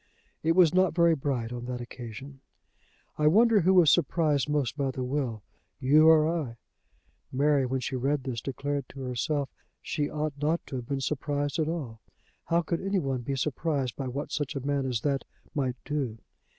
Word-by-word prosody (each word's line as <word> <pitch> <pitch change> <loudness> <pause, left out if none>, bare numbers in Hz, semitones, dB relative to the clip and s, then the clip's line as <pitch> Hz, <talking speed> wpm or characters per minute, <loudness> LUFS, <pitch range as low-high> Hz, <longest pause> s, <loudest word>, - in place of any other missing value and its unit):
It 165 +1 +2
was 175 -2 +5
not 185 -2 +3
very 170 -1 +5
bright 130 -5 -2
on 120 0 -5
that 125 0 -4
occasion. 120 +3 -9 0.8
"I 150 - +4
wonder 220 +6 +5
who 190 +3 +4
was 175 -4 +7
surprised 155 -3 +2
most 145 -5 0
by 140 -2 0
the 130 0 -3
will, 125 -5 -2 0.4
you 150 +4 +5
or 155 -1 +6
I?" 155 -8 -2 0.7
Mary, 140 0 +2
when 130 +1 -1
she 130 - -3
read 135 +2 0
this, 125 -4 -4
declared 140 0 -3
to 135 - -9
herself 135 +3 -2
that - - -39
she 145 -3 -2
ought 155 0 -2
not 160 +3 +2
to 130 - -5
have 120 -2 -6
been 140 -1 -2
surprised 145 +1 -1
at 155 0 +1
all. 130 -10 -5 0.4
How 170 +1 +2
could 165 +1 -2
anyone 160 -10 -1
be 135 +3 -3
surprised 135 -1 -1
by 135 - -4
what 140 +4 -4
such 145 0 -2
a 135 -1 -4
man 140 -2 0
as 120 -4 -1
that 140 -1 0 0.3
might 130 -4 -1
do? 135 -6 -2
140 Hz, 190 wpm, -28 LUFS, 130-155 Hz, 0.8 s, was